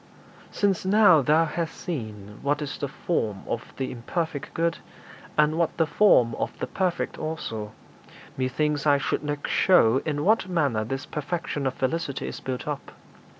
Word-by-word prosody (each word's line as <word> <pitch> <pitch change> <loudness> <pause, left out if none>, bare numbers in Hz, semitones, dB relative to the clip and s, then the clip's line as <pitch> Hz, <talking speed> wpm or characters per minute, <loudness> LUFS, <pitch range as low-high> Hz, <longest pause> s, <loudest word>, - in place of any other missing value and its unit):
X. - - -14
'Since 200 -3 +2
now 200 -6 +6
thou 155 +4 +4
hast 160 +1 -3
seen 105 - -6
what 145 +1 +1
is 145 - -5
the 140 - -1
form 115 - -2
of 120 - -4
the 130 - -2
imperfect 150 +5 -3
good, 165 0 0 0.6
and 155 +2 +3
what 170 - 0
the 165 - +3
form 150 - +4
of - - -3
the - - -2
perfect 180 -2 -2
also, 115 -10 -4 0.6
methinks 145 +3 0
I 145 -1 +6
should 140 - -1
next 145 -1 -3
show 135 -9 +5
in 150 -1 -2
what 215 -2 +3
manner 140 -11 +1
this 135 +4 -4
perfection 150 -2 -3
of 130 - -2
felicity 140 +1 -2
is - - -6
built 130 +1 -5
up. 145 -2 -5
150 Hz, 165 wpm, -26 LUFS, 130-165 Hz, 0.6 s, now